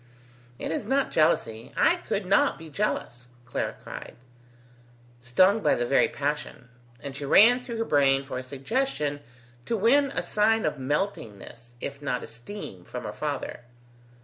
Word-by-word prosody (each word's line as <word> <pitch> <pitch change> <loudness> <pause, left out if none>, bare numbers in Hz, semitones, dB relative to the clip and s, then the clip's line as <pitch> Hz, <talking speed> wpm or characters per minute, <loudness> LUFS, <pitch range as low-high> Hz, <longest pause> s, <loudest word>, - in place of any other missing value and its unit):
"It - - -4
is 205 - -3
not 270 +2 +1
jealousy; 115 -8 +1
I 355 - +4
could 205 - -3
not 195 +2 +3
be 165 -2 -11
jealous!" 125 - -2 0.2
Clara 120 - -3
cried, - - -8 1.0
stung 185 - +4
by - - +3
the 120 - -1
very 135 - +4
passion; 145 -3 -4 0.3
and 140 -1 -7
she 145 - -6
ran 225 - +6
through 245 -2 -6
her 225 - -1
brain 135 -4 +3
for 135 -2 -5
a - - -6
suggestion 145 - -2 0.5
to 230 - 0
win 250 +8 +4
a 275 - -3
sign 220 +1 +2
of 150 -2 -1
meltingness 120 - -4
if 140 +3 -6
not 125 -4 -2
esteem 120 - -8
from 125 +7 -7
her 105 - -5
father. 140 +5 -4
145 Hz, 155 wpm, -27 LUFS, 125-210 Hz, 1.0 s, ran